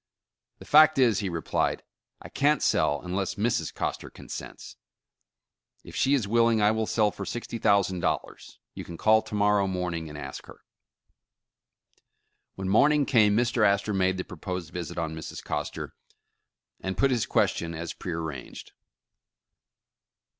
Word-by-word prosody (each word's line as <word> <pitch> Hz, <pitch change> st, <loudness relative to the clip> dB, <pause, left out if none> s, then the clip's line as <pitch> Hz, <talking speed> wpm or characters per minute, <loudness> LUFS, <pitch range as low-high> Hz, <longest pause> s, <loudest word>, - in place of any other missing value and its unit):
''The -, -, -12 dB
fact 155 Hz, 0 st, +6 dB
is," 120 Hz, -6 st, +4 dB
he 100 Hz, -3 st, -2 dB
replied, 85 Hz, -2 st, -1 dB, 0.4 s
"I -, -, -8 dB
can't 150 Hz, +2 st, +2 dB
sell 75 Hz, 0 st, +2 dB
unless 95 Hz, +1 st, -2 dB
Mrs. 110 Hz, +3 st, 0 dB
Coster -, -, -4 dB
consents. -, -, -9 dB, 1.1 s
If -, -, -12 dB
she 140 Hz, +2 st, +3 dB
is 120 Hz, -7 st, -1 dB
willing, 115 Hz, +1 st, +3 dB
I 105 Hz, 0 st, +4 dB
will 110 Hz, 0 st, -1 dB
sell 105 Hz, -2 st, +2 dB
for -, -, -7 dB
sixty 120 Hz, -1 st, -5 dB
thousand 100 Hz, -3 st, +2 dB
dollars. -, -, -3 dB, 0.2 s
You -, -, -7 dB
can 85 Hz, -, -9 dB
call 110 Hz, +3 st, +4 dB
to 110 Hz, -1 st, -7 dB
morrow 105 Hz, -1 st, +3 dB
morning 90 Hz, -3 st, -3 dB
and 75 Hz, -, -9 dB
ask 70 Hz, -2 st, -8 dB
her." -, -, -14 dB, 1.9 s
When 95 Hz, -1 st, -5 dB
morning 145 Hz, +8 st, +4 dB
came 110 Hz, -6 st, +4 dB
Mr. 120 Hz, -1 st, +1 dB
Astor 100 Hz, +1 st, +2 dB
made 95 Hz, -1 st, +1 dB
the 90 Hz, -, -2 dB
proposed 90 Hz, -1 st, -6 dB
visit 90 Hz, -2 st, -5 dB
on 80 Hz, -2 st, -2 dB
Mrs. 80 Hz, -1 st, -7 dB
Coster, -, -, -4 dB, 0.9 s
and 95 Hz, 0 st, -4 dB
put 135 Hz, -1 st, +3 dB
his 120 Hz, -4 st, 0 dB
question, 85 Hz, 0 st, 0 dB
as 85 Hz, +1 st, -5 dB
prear 85 Hz, -2 st, -5 dB
ranged. 75 Hz, -6 st, -7 dB
100 Hz, 150 wpm, -27 LUFS, 90-115 Hz, 1.9 s, fact